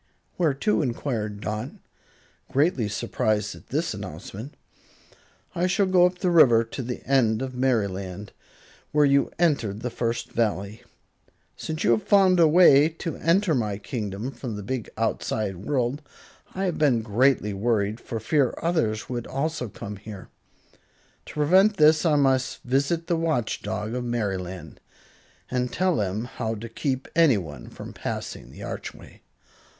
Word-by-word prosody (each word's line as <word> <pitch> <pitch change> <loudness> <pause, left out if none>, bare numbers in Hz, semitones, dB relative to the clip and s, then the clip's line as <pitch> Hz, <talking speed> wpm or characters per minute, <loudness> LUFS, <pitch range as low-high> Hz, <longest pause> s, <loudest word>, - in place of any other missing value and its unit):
"Where 160 -6 +1
to?" 210 +8 +1
enquired 115 -6 -3
Dot, 110 +5 -3 0.8
greatly 140 - +2
surprised 105 0 -1
at - - -15
this 155 +5 -1
announcement. 100 - -8 1.0
"I 175 +2 +1
shall 195 +2 +2
go 180 -1 +5
up 180 0 -6
the 180 -1 0
river 125 -9 +6
to 115 +4 -6
the 125 0 -6
end 120 -3 +2
of 130 -1 -5
Merryland, 100 -6 -1 0.6
where 150 0 +4
you 140 0 +3
entered 130 - +1
the 125 - -3
First 115 0 -2
Valley. 105 -2 -1 0.7
Since 155 0 -4
you 115 - +4
have 115 -2 +3
found 190 -3 +4
a 165 - +7
way 155 -3 +6
to 165 0 -5
enter 170 +2 +2
my 105 -7 -1
kingdom 105 +2 -4
from 120 -3 -6
the 105 - -6
big 125 +1 -4
outside 110 -3 -1
world, 125 - -1 0.5
I 190 - -2
have 180 -3 -1
been 130 -7 +3
greatly 115 0 +2
worried 105 +1 0
for 115 - -5
fear 130 +4 +1
others 150 -11 0
would 120 -2 -4
also 140 -3 -2
come 100 +1 -8
here. 100 -1 -10 1.0
To - - -9
prevent 190 +8 +4
this 155 +2 +5
I 155 - +3
must 135 -2 +1
visit 140 +6 0
the 170 - 0
Watch 160 -9 -1
Dog 105 +1 -4
of 125 0 -2
Merryland, 95 -6 -4 0.7
and 125 -1 -1
tell 185 -7 +1
him 100 +4 -2
how 115 -2 -4
to 115 +2 -7
keep 130 +3 -2
anyone 100 - +2
from - - -10
passing - - -5
the - - -11
archway." - - -8
125 Hz, 150 wpm, -25 LUFS, 105-155 Hz, 1.0 s, a